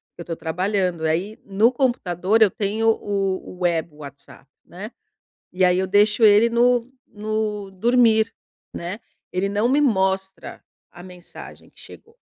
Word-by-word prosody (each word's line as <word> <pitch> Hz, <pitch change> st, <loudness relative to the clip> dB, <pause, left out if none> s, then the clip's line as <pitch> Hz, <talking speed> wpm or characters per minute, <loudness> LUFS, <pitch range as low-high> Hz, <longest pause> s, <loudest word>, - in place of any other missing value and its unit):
que -, -, -31 dB
eu -, -, -9 dB
tô 165 Hz, -, -5 dB
trabalhando. 180 Hz, +1 st, -2 dB
Aí, 175 Hz, +7 st, -2 dB
no 205 Hz, +5 st, +2 dB
computador 225 Hz, -6 st, 0 dB
eu 210 Hz, -3 st, +5 dB
tenho 215 Hz, +3 st, -1 dB
o 200 Hz, -3 st, -1 dB, 0.2 s
o 180 Hz, -, -15 dB
web 170 Hz, -3 st, -1 dB
WhatsApp, 140 Hz, -2 st, -13 dB, 0.2 s
né. 205 Hz, +6 st, -10 dB, 0.6 s
E 185 Hz, +1 st, +1 dB
aí 180 Hz, 0 st, +3 dB
eu 190 Hz, -, 0 dB
deixo 210 Hz, +4 st, +2 dB
ele 210 Hz, +2 st, +6 dB
no 240 Hz, +1 st, +2 dB, 0.2 s
no 210 Hz, -2 st, -4 dB
dormir, 225 Hz, +2 st, +2 dB, 0.4 s
né. 180 Hz, +6 st, -6 dB, 0.3 s
Ele 185 Hz, +2 st, -1 dB
não 205 Hz, +4 st, 0 dB
me 275 Hz, +3 st, +2 dB
mostra 190 Hz, -, -1 dB, 0.3 s
a 175 Hz, -, -13 dB
mensagem 180 Hz, -1 st, -13 dB
que -, -, -27 dB
chegou. 455 Hz, +1 st, -15 dB
200 Hz, 150 wpm, -21 LUFS, 180-220 Hz, 0.6 s, ele